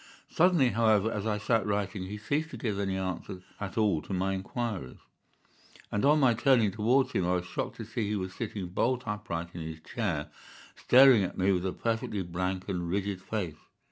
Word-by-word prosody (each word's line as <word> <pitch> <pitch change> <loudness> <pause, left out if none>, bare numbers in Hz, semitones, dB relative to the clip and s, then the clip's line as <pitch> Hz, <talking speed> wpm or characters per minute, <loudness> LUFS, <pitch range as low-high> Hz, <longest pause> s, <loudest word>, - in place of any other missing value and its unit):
Suddenly, 170 -7 +4
however, 110 -1 +3
as 105 0 -3
I 105 -1 0
sat 110 +1 +1
writing, 100 -1 -2
he 105 +2 -5
ceased 145 +9 -1
to 125 - -8
give 110 -3 -2
any 95 -1 -1
answer 95 0 -4 0.2
at 100 0 -5
all 105 -8 +2
to 95 - -7
my 95 +1 0
inquiries, 95 - -4 0.9
and 105 - -1
on 150 +2 +5
my 130 -4 +5
turning 115 -3 +3
towards 120 +7 +2
him - - 0
I 90 - +2
was 90 -1 -2
shocked - - -4
to 115 - -7
see 115 0 -3
that - - -3
he 105 - 0
was 95 -2 -4
sitting 100 -5 -5
bolt 125 +7 0
upright 105 -6 -4
in 85 - -6
his 80 0 -6
chair, - - -3 0.4
staring 130 -3 +7
at 95 - -3
me 95 +1 +3
with 90 0 0
a - - -1
perfectly 110 -2 -2
blank 90 +2 -3
and 90 -3 -2
rigid 100 0 -2
face. 90 -9 -4
105 Hz, 205 wpm, -29 LUFS, 95-115 Hz, 0.9 s, staring